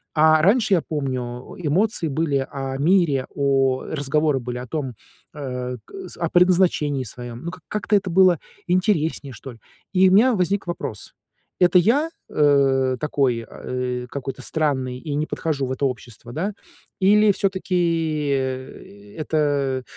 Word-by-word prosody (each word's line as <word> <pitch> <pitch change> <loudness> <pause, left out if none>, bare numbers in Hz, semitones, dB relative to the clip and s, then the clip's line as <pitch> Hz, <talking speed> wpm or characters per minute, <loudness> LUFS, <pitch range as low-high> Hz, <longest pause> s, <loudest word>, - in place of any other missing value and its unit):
А 155 0 +5
раньше, 210 +3 +3
я 165 - +1
помню, 130 -5 -4
эмоции 180 +3 +1
были 140 -2 0
о 135 -1 -4
мире, 150 -4 +2
о 135 -2 +2
разговоры 150 -1 0
были 125 0 -5
о 125 - -6
том, 135 -4 -4 0.4
э, 125 -3 -4
к - - -21 0.2
с, - - -10
о 170 -2 -1
предназначении 175 -6 +3
своем. 120 +2 -8
Ну 170 - -3
к - - -8
как 170 - -20
как-то 210 0 0
это 190 -1 -3
было 185 -2 +5 0.3
интереснее, 170 - 0
что 130 +4 -9
ли. 115 - -18 0.3
И 185 0 +5
у - - +3
меня 240 +5 +6
возник 190 +2 0
вопрос: 110 -11 -5 0.5
это 180 0 +5
я, 280 - +2 0.2
э, 135 -3 +3
такой, 135 -6 0
а, - - -13
э, 125 -1 -3
какой-то 135 -1 -6
странный 130 -5 -1
и 150 0 -5
не 150 +1 0
подхожу 145 -4 -2
в - - -4
это 140 +1 -1
общество, 120 -1 -6
да, 195 +6 -2 0.5
или 205 +2 +5
всё-таки, 170 -6 0
э, 130 -6 -5
это 145 -4 0
145 Hz, 155 wpm, -22 LUFS, 130-180 Hz, 0.5 s, меня